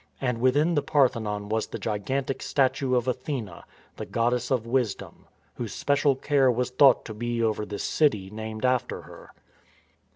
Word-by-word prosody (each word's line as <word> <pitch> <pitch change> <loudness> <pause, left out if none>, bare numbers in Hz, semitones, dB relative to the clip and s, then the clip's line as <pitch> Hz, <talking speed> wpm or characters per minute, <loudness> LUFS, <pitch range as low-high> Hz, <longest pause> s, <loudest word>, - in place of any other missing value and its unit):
^ - - -32 0.2
And 125 -3 -1
within 145 +7 +3
the 145 - +2
Parthenon 115 -8 +1
was 110 +1 -1
the - - -6
gigantic 115 +6 -2
statue 130 -1 +1
of 125 0 0
Athene, 125 - -3 0.5
the - - -5
goddess 120 +1 0
of 125 -4 0
Wisdom, 120 -3 -2 0.3
whose 115 -2 -6
special 145 0 +2
care 135 0 +2
was 125 +1 -1
thought 130 0 +5
to 110 - -6
be 120 +1 -2
over 105 -1 -1
this 105 - -5
city 105 -11 +1
named 110 +2 -5
after 125 0 0
her. - - -13
125 Hz, 165 wpm, -26 LUFS, 110-135 Hz, 0.5 s, thought